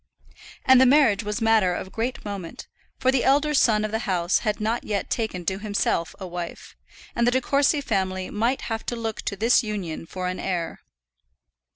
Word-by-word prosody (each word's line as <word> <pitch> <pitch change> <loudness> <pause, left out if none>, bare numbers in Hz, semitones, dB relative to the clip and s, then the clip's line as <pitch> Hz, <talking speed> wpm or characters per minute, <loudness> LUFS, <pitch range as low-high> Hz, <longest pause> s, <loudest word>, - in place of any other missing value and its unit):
And 260 -1 +7
the 260 - +6
marriage 250 -7 +4
was 210 +3 -3
matter 215 -5 +3
of 190 - -6
great 235 +2 -3
moment, 200 -5 -6 0.3
for 260 - +2
the 265 -2 +1
elder 290 +3 +3
scion 215 -6 +3
of 215 - -4
the 220 - -1
house 175 -1 +2
had 210 -2 -2
not 220 +3 -1
yet 205 -2 -3
taken 215 -7 -2
to 190 +3 -1
himself 205 -5 -1
a 190 - -6
wife, 175 -1 -7 0.4
and 235 0 +2
the - - +4
De 260 - +2
Courcy 285 +2 +2
family 190 -6 -2
might 235 +5 0
have 225 -1 -4
to 240 - -2
look 225 -2 -4
to - - -3
this 230 +6 +4
union 195 -8 -5
for 185 +1 -4
an 185 0 -3
heir. 175 -3 -3
215 Hz, 195 wpm, -24 LUFS, 190-240 Hz, 0.4 s, And